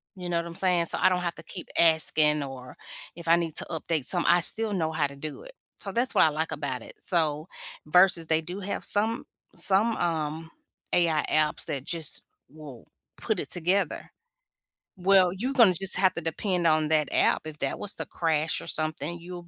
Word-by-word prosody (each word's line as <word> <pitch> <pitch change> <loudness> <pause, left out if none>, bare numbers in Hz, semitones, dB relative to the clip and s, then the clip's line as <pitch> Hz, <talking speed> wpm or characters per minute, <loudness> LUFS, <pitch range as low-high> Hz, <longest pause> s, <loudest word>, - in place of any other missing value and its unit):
You 180 -1 -7
know 170 - 0
what 170 - -2
I'm 170 - -9
saying? 180 -3 +1
So - - -2
I - - +5
don't 180 - 0
have 170 -1 -3
to - - -12
keep 180 - -8
asking 155 -2 +4
or 130 -2 -9 0.4
if 170 -1 -9
I 165 - +6
need 165 -3 -3
to - - -4
update 160 -3 -2
some, 175 -2 0
I 175 0 +5
still 220 +4 -1
know 160 -4 -1
how 150 -2 +1
to 140 - -12
do 150 +1 -8
it. - - -12 0.3
So 195 - -5
that's 245 +2 -1
what - - +6
I - - +4
like 155 +2 -3
about 135 -4 -4
it. - - -12
So 155 -3 0 0.4
versus 180 0 +4
they 160 0 +2
do 180 +5 -7
have 200 - -4
some 220 +3 0 0.3
some, 210 +4 +4
um, 160 -1 -2 0.4
AI 165 -3 +2
apps 155 -1 +1
that 135 -2 -3
just 165 -4 -2 0.3
will 145 -5 -13 0.3
put - - -2
it - - -5
together. 180 +3 0 0.9
Well, 185 -1 +4
you 245 +8 -3
gonna 230 -9 +6
just 195 +2 +3
have 190 -2 +3
to 170 - -3
depend 175 +2 -2
on 155 -1 +2
that 155 -2 +2
app. - - +2
If 155 -1 -9
that 135 - -2
was 205 - +1
to - - -5
crash 160 -1 -1
or - - -10
something, 155 +1 -2
you 175 0 -10
170 Hz, 205 wpm, -26 LUFS, 155-185 Hz, 0.9 s, I